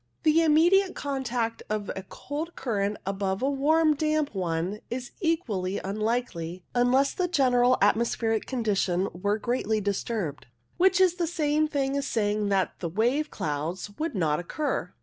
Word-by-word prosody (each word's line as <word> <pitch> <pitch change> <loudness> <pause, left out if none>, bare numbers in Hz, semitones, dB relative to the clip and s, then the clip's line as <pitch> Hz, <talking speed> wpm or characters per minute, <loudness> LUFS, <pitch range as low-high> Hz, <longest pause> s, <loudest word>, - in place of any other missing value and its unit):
The 315 +1 +5
immediate 345 +5 +4
contact 250 -5 -2
of 210 -1 -2
a 190 - -4
cold 295 - -6
current 205 -4 -1
above 195 +2 -2
a 270 - +3
warm 310 +3 +3
damp 305 -1 0
one 180 +1 -2
is 245 0 -5
equally 220 - -1
unlikely, 195 -5 -2
unless 250 +3 +3
the 365 - 0
general 255 -5 +3
atmospheric 225 +1 +1
condition 200 -7 0
were 205 +4 0
greatly 220 -1 0
disturbed, 200 - -3 0.3
which 375 0 +4
is 365 -2 +4
the 345 -2 0
same 310 -2 +1
thing 275 -2 -1
as 280 0 -1
saying 210 -2 0
that 195 -2 0
wave 230 - 0
clouds 160 +7 -3
would 320 -5 -2
not 155 -5 +1
occur. 290 - -2
235 Hz, 145 wpm, -27 LUFS, 195-295 Hz, 0.3 s, The